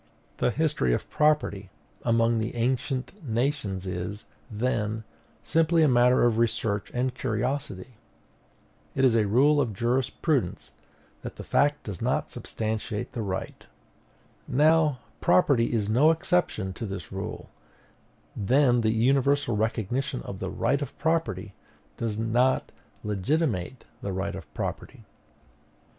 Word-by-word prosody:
The - - +2
history 145 - +1
of - - -6
property 145 -11 +1 0.3
among 115 0 +2
the 110 +2 -3
ancient 130 - -2
nations 115 -6 -1
is, 95 +3 -5 0.2
then, 110 -1 -1 0.4
simply 165 +1 +3
a - - +5
matter 125 -1 +4
of 115 -2 +2
research 110 -3 0
and 125 +1 -1
curiosity. 125 -2 -3 1.0
It 135 - +3
is 120 -3 +4
a 110 -2 +3
rule 145 +7 +4
of 120 -6 -1
jurisprudence 125 - 0 0.5
that - - -7
the - - -8
fact - - +2
does - - -7
not - - 0
substantiate 110 -1 -4
the 120 - -4
right. 95 -3 -5 0.8
Now, 150 -1 +3 0.2
property 115 +6 +3
is 110 -4 0
no 125 +9 +5
exception 160 - 0
to 115 +3 -5
this 95 -4 -6
rule: - - -6 0.8
then 125 +3 +3
the 110 - +2
universal 135 +1 +2
recognition 110 - -1
of - - -7
the - - -3
right 140 - 0
of 145 - -6
property 135 - -1 0.4
does 110 -3 -2
not 120 +4 +1 0.3
legitimate 105 - -1 0.2
the 100 - -3
right 95 +1 -2
of - - -9
property. - - -5
120 Hz, 125 wpm, -27 LUFS, 105-140 Hz, 1.0 s, a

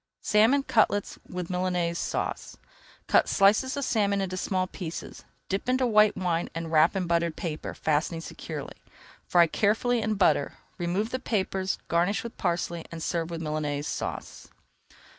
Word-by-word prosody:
SALMON 225 +7 +4
CUTLETS 205 -5 +1
WITH 180 -1 -5
MILANAISE 180 -2 0
SAUCE - - -3 0.5
Cut - - +3
slices 220 +8 +3
of 280 - -1
salmon 200 -3 +1
into 190 -1 -2
small 185 0 0
pieces, 175 -3 -7 0.2
dip 195 +6 -2
into 255 0 +2
white 215 -3 +4
wine 175 -2 -1
and 165 -1 -4
wrap 160 +3 +4
in 190 -2 0
buttered 170 -1 +1
paper, 160 -3 -5
fastening 155 +2 0
securely. - - -7 0.5
Fry 175 -1 +6
carefully 225 +7 +1
in 215 0 0
butter, 155 -7 +2 0.2
[Page 175 - -2
277] - - -1
remove 210 +4 0
the 255 - -2
papers, 190 -4 -1
garnish 175 +5 +1
with 235 - -7
parsley, 170 -2 -1
and 165 -1 -6
serve 165 -1 -1
with 165 -1 -5
Milanaise 150 -2 -2
Sauce. - - -5
185 Hz, 160 wpm, -27 LUFS, 170-210 Hz, 0.5 s, Fry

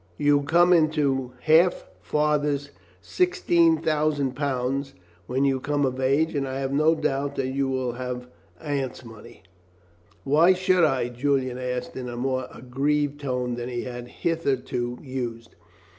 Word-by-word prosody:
You 145 0 +3
come 175 +5 +4
into 145 -6 +1
half 165 +5 +3
father's 150 -1 0 0.3
£16,000 150 - +1 0.3
when 130 +3 +1
you 135 -1 +1
come 145 +1 0
of 130 0 -2
age, 140 +5 +2
and 140 -2 -1
I 130 0 -4
have 135 0 -2
no 155 +3 +4
doubt 140 -1 -1
that 130 -1 -1
you 135 +1 -1
will 130 -2 -1
have 125 0 -5 0.3
Aunt's 140 -4 -3
money." 110 -2 -13 0.8
"Why 160 +7 +5
should 185 -1 +2
I?" 130 -5 0
Julian 130 0 -1
asked 125 -1 -4
in 125 -1 -5
a 120 - -6
more 130 0 -1
aggrieved 145 +3 -1
tone 125 -3 -2
than 120 +1 -4
he 120 -1 -3
had 120 -1 -7
hitherto 130 -6 -2
used. 120 -4 -5
135 Hz, 140 wpm, -25 LUFS, 125-150 Hz, 0.8 s, Why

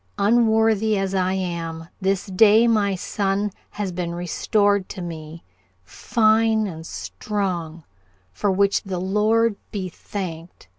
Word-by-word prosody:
Unworthy 220 -1 +3
as 195 0 -1
I 185 -1 +1
am, 165 -3 -4
this 195 0 0
day 215 +4 +5
my 205 -4 +2
son 200 +2 -1 0.2
has 205 -3 -4
been 175 -1 -4
restored 200 +3 +1
to - - -7
me, 165 -1 -8 0.4
fine 220 - +2
and 160 -4 -7
strong, 175 -6 -4 0.5
for 205 - -1
which 200 +1 +2
the 190 -2 -5
Lord 210 +3 +2
be 190 -3 -3
thanked. 170 - -7
195 Hz, 120 wpm, -22 LUFS, 175-215 Hz, 0.5 s, day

